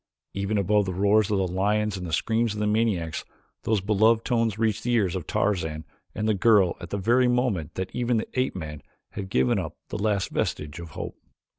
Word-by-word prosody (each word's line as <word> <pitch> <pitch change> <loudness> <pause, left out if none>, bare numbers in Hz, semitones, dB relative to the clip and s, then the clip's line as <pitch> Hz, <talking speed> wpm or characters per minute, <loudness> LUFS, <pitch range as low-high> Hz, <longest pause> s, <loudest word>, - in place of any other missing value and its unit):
Even 100 +2 -1
above 100 +1 +2
the 95 -2 -3
roars 100 +2 +3
of 105 - +1
the 95 -1 +1
lions 105 +3 0
and 90 -2 -5
the - - -6
screams 110 +6 +1
of - - -5
the 105 - 0
maniacs, 105 -7 0 0.4
those 110 -3 +2
beloved 110 +3 +3
tones 115 -4 +1
reached 110 -2 0
the 120 - 0
ears 100 -6 +2
of 90 -4 -5
Tarzan 80 -6 -1 0.3
and 110 +1 -1
the 110 - +3
girl 100 -3 +4
at - - -8
the 100 - -2
very 120 +6 +3
moment 120 - 0
that 95 0 -4
even 120 -1 +1
the 110 - -2
ape 130 0 0
man 75 -4 -6 0.3
had 95 -2 -6
given 65 -7 +2
up - - -5
the - - -4
last 105 -3 0
vestige 75 +1 -2
of 85 -1 -8
hope. - - -5
105 Hz, 210 wpm, -26 LUFS, 95-110 Hz, 0.4 s, girl